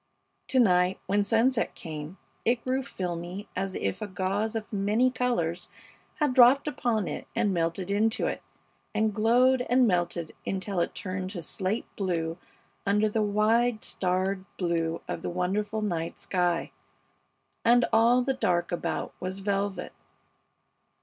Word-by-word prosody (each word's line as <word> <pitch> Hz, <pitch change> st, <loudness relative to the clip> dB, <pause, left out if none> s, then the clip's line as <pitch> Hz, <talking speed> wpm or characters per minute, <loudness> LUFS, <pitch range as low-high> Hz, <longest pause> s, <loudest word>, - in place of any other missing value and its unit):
To 260 Hz, -, +2 dB
night, 180 Hz, -4 st, +4 dB
when 205 Hz, +1 st, +2 dB
sunset 230 Hz, +4 st, +2 dB
came, 155 Hz, +2 st, -7 dB, 0.3 s
it 235 Hz, 0 st, +1 dB
grew 260 Hz, +1 st, +1 dB
filmy 180 Hz, -3 st, -5 dB
as 190 Hz, 0 st, -2 dB
if 100 Hz, -, -2 dB
a 215 Hz, -, -3 dB
gauze 200 Hz, +3 st, -1 dB
of 220 Hz, 0 st, -5 dB
many 210 Hz, +6 st, +2 dB
colors 180 Hz, -10 st, -1 dB, 0.5 s
had 295 Hz, -4 st, +1 dB
dropped 255 Hz, +3 st, +6 dB
upon 230 Hz, -, 0 dB
it 150 Hz, -, -5 dB
and 215 Hz, -4 st, +2 dB
melted 170 Hz, +2 st, -1 dB
into 220 Hz, +4 st, +1 dB
it, -, -, -2 dB, 0.5 s
and 215 Hz, 0 st, +2 dB
glowed 245 Hz, +4 st, +4 dB
and 250 Hz, +1 st, +5 dB
melted 175 Hz, -4 st, 0 dB
until 195 Hz, 0 st, -2 dB
it 170 Hz, -, -1 dB
turned 185 Hz, -3 st, -4 dB
to 175 Hz, -4 st, -5 dB
slate 190 Hz, +7 st, -2 dB
blue 170 Hz, -3 st, -2 dB, 0.4 s
under 210 Hz, +2 st, +2 dB
the 215 Hz, +1 st, 0 dB
wide, 215 Hz, +3 st, +2 dB
starred 185 Hz, +1 st, -1 dB
blue 165 Hz, -2 st, -1 dB
of -, -, -4 dB
the -, -, -3 dB
wonderful 205 Hz, +5 st, -1 dB
night 170 Hz, -5 st, -2 dB
sky, 175 Hz, -2 st, 0 dB, 0.9 s
and 240 Hz, +1 st, +5 dB
all 235 Hz, +3 st, +5 dB
the 270 Hz, +1 st, +1 dB
dark 175 Hz, -8 st, 0 dB
about 175 Hz, -, -2 dB
was 185 Hz, +1 st, -3 dB
velvet. 200 Hz, 0 st, -2 dB
200 Hz, 145 wpm, -28 LUFS, 180-230 Hz, 0.9 s, dropped